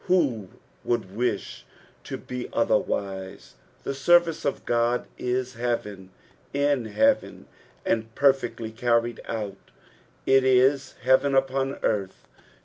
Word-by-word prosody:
Who 130 - +1 0.3
would 110 -5 -2
wish 115 -3 -2 0.4
it - - -16
to - - -4
be 125 -1 -6
otherwise? 95 -1 -1 0.3
The - - -2
service 170 +4 +3
of 140 - -2
Qod 120 +1 +1
is 125 +1 -2
heaven 105 -6 -3 0.5
in 140 -3 +1
heaven, 275 - +1 0.4
and 115 0 -1
perfectly 135 -5 +1
carried 115 0 0
out 105 -4 -5 0.6
it 135 0 +5
is 130 +1 +3
hi'BVen 130 +2 +4
upon 135 0 0
earth. 100 -3 -1
125 Hz, 115 wpm, -25 LUFS, 110-135 Hz, 0.6 s, it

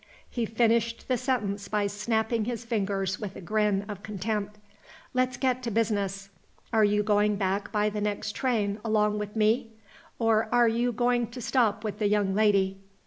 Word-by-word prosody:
He 235 -3 -2
finished 230 0 +1
the 255 - +2
sentence 215 -6 -1
by 210 0 0
snapping 220 +2 0
his 235 0 -4
fingers 195 -4 -1
with 200 -3 -6
a - - -7
grin 205 +1 0
of 205 -2 -7
contempt. 210 0 -3 0.6
"Let's 255 0 +1
get 255 -1 0
to 240 - -3
business. 200 -3 -1 0.4
Are 220 -1 +5
you 210 0 +3
going 210 0 +2
back 200 +1 -1
by 210 0 +1
the 210 0 -3
next 210 0 -2
train 215 -5 -1
along 210 -1 +1
with 210 +1 -5
me? 225 +2 +2 0.4
or 225 -1 +2
are 240 -1 +5
you 235 +2 +1
going 240 0 +1
to 240 +3 -9
stop 225 -4 +1
with 215 -2 -4
the 210 - +2
young 205 -2 +1
lady?" 195 -2 +2
215 Hz, 175 wpm, -27 LUFS, 205-230 Hz, 0.6 s, Are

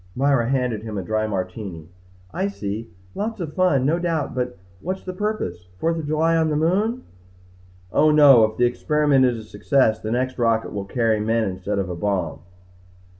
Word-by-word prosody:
Myra 135 -3 +2
handed 125 -5 0
him 110 -2 -6
a 95 - -3
dry 110 +3 -1
Martini. 95 -4 -5 0.5
"I 190 +2 0
see. 110 - -5 0.2
Lots 220 +1 -3
of 160 -4 -5
fun 155 -8 +2
no 160 +5 +2
doubt 165 -4 -1
but 125 -4 -3 0.2
what's 185 - -4
the 185 - -5
purpose? 180 - -3
Fourth 165 - 0
of 155 - -5
July 160 +2 +2
on 160 -1 +2
the 150 - 0
moon?" 205 +11 +1 0.9
"Oh, 155 +7 +4
no. 145 -6 +7
If 110 0 -5
the 125 - +4
experiment 140 +2 +2
is 125 -2 +1
a 110 - -8
success 110 +2 +1
the 110 - -5
next 130 +2 -1
rocket 115 -1 +1
will 100 -1 -4
carry 110 +1 +1
men 115 +2 +1
instead 95 +2 -3
of 95 -2 -1
a 90 - -4
bomb." 90 -4 -2
125 Hz, 185 wpm, -22 LUFS, 105-155 Hz, 0.9 s, no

